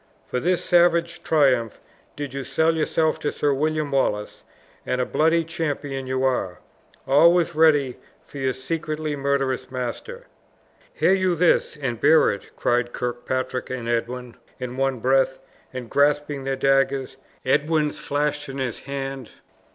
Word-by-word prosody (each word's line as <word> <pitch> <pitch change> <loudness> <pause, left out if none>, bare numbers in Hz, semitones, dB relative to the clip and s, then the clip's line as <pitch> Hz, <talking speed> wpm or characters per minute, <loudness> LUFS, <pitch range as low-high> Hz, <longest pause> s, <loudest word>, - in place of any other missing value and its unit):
For 125 - -2
this 180 +5 0
savage 170 -1 +3
triumph 130 -8 +2 0.4
did 145 -2 -5
you 140 0 -4
sell 160 +5 +1
yourself 160 0 +1
to 145 - -1
Sir 145 -1 0
William 155 +1 -1
Wallace; 105 -6 -1 0.4
and 125 - -2
a 125 - +1
bloody 165 +4 +2
champion 145 -5 -4
you 130 0 -1
are, 125 -9 0 0.5
always 170 +5 +4
ready 150 -5 +3 0.3
for 140 - -10
your 130 -1 0
secretly 155 +2 -3
murderous 135 -2 -1
master!" 130 - -5 0.7
"Hear - - +2
you 185 -2 +2
this, 165 -1 +2
and 120 -5 -3
bear 155 +2 +5
it?" 100 - -7
cried 120 0 0
Kirkpatrick 130 +1 -3
and 125 -2 -4
Edwin 120 +1 -3 0.2
in 125 -1 -5
one 135 0 0
breath, 135 +1 +2 0.3
and 130 -2 -6
grasping 145 0 +1
their 135 0 0
daggers, 135 0 +1 0.3
Edwin's 150 +2 +1
flashed 145 0 -2
in 135 - -6
his 130 -3 -3
hand. 135 -2 -5
135 Hz, 145 wpm, -23 LUFS, 130-155 Hz, 0.7 s, bear